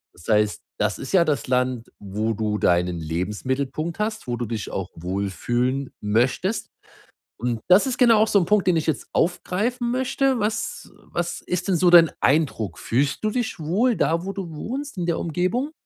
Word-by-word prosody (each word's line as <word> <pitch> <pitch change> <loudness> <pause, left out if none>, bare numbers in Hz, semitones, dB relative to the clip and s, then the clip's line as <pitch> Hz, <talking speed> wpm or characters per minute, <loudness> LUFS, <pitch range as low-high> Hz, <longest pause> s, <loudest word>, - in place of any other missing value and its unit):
Das 85 - -15
heißt, 105 -1 +2 0.2
das 105 -3 0
ist 135 - -6
ja 170 -3 +5
das 145 -7 -1
Land, 125 -2 0
wo 105 +3 -2
du 105 0 -1
deinen 90 -1 +2
Lebensmittelpunkt 130 - -3
hast, 215 - -2
wo 120 -1 -2
du 120 - -2
dich 110 -2 -4
auch 95 -1 -3
wohlfühlen 120 +9 -2
möchtest 125 - 0 0.7
und 120 -1 -1
das 190 +9 +7
ist 250 -1 -2
genau 235 -3 +6
auch 220 - +4
so 200 - +4
'n 175 - +1
Punkt, 210 +1 +2
den 175 -2 +4
ich 160 - -2
jetzt 155 - -1
aufgreifen 225 +8 0
möchte. 260 0 +1
Was 225 - -3 0.2
was 170 0 -3
ist 180 +1 -3
denn 185 - +2
so 180 +1 +4
dein 170 -2 +8
Eindruck? 130 - +1
Fühlst 140 - 0
du 215 - +2
dich 240 -7 -2
wohl 205 +10 +1
da, 165 +3 +1
wo 195 - -3
du 175 -5 -6
wohnst, 270 - -5
in 175 - -1
der 170 - 0
Umgebung? 185 - -1
160 Hz, 185 wpm, -23 LUFS, -, 0.7 s, dein